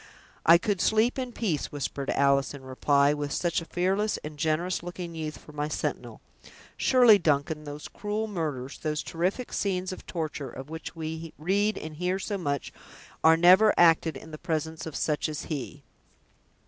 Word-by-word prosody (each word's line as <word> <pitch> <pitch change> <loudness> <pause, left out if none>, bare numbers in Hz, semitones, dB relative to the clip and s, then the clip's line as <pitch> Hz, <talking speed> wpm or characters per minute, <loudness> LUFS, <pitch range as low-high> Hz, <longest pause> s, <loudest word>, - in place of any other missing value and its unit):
"I 165 +1 +9
could 195 +1 -1
sleep 225 +4 +2
in 255 -1 -3
peace," 190 - -2
whispered 140 -1 -4
Alice, 140 0 +2
in 135 - -11
reply, 140 +2 +2
"with 145 -1 -3
such 170 +2 0
a - - -8
fearless 190 +5 0
and 150 0 -7
generous 160 +4 0
looking 175 0 -6
youth 155 -1 -5
for - - -14
my 150 0 -2
sentinel. 155 - -4 0.5
Surely, 245 -5 +6
Duncan, 150 -1 0
those 145 +1 -7
cruel 210 +1 -3
murders, 150 -10 -4
those 150 -1 -2
terrific 185 +9 -2
scenes 185 -2 -1
of 185 - -9
torture, 155 -5 -4
of 135 +5 -9
which 160 +1 -7
we 160 0 -5
read 200 +7 +1
and 155 -1 -7
hear 180 +2 0
so 200 +1 -3
much, 140 -5 -3 0.5
are 160 0 +7
never 185 +5 +6
acted 165 -3 +4
in 160 - -12
the 155 - -8
presence 160 0 -3
of 160 - -7
such 150 0 0
as 155 -1 -4
he!" 145 -1 -5
160 Hz, 175 wpm, -27 LUFS, 150-185 Hz, 0.5 s, I